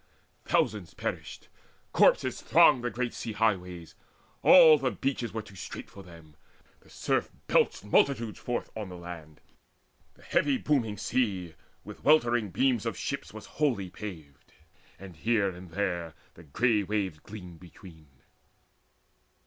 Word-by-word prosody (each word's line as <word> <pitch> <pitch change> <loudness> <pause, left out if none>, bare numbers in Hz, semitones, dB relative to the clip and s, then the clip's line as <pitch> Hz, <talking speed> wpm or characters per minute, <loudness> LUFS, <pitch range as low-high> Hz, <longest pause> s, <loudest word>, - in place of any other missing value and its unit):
Thousands 100 -5 0
perished; - - -5 0.5
corpses - - +3
thronged 125 - +5
The 120 - 0
great 120 +2 -3
sea 115 - -5
highways: 90 -6 -1 0.5
all 160 -4 +8
the 130 - 0
beaches 130 -3 -3
were 110 -1 -4
Too 100 - -15
strait 90 - -8
for 100 - -11
them: 85 -4 -15 0.4
the - - -23
surf - - -1 0.2
belched - - +1
multitudes 115 0 +1
Forth 120 - -4
on 105 -3 -5
the 90 - -9
land. 85 -3 -10 0.7
The - - -21
heavy 140 -2 +1
booming 120 -9 0
sea 95 -7 -1 0.3
With - - -11
weltering 120 -8 +3
beams 125 +2 +1
of - - -3
ships - - -4
was - - -10 0.2
wholly 105 -11 +1
paved, 80 -10 -10 0.4
And 95 -2 -11
here 110 +1 +1
and 90 0 -11
there 85 -3 -3 0.2
the 85 - -15
grey 105 - +2
waves 100 -5 -2
gleamed 90 -3 -11
between. 85 -3 -15
100 Hz, 140 wpm, -28 LUFS, 90-120 Hz, 0.7 s, all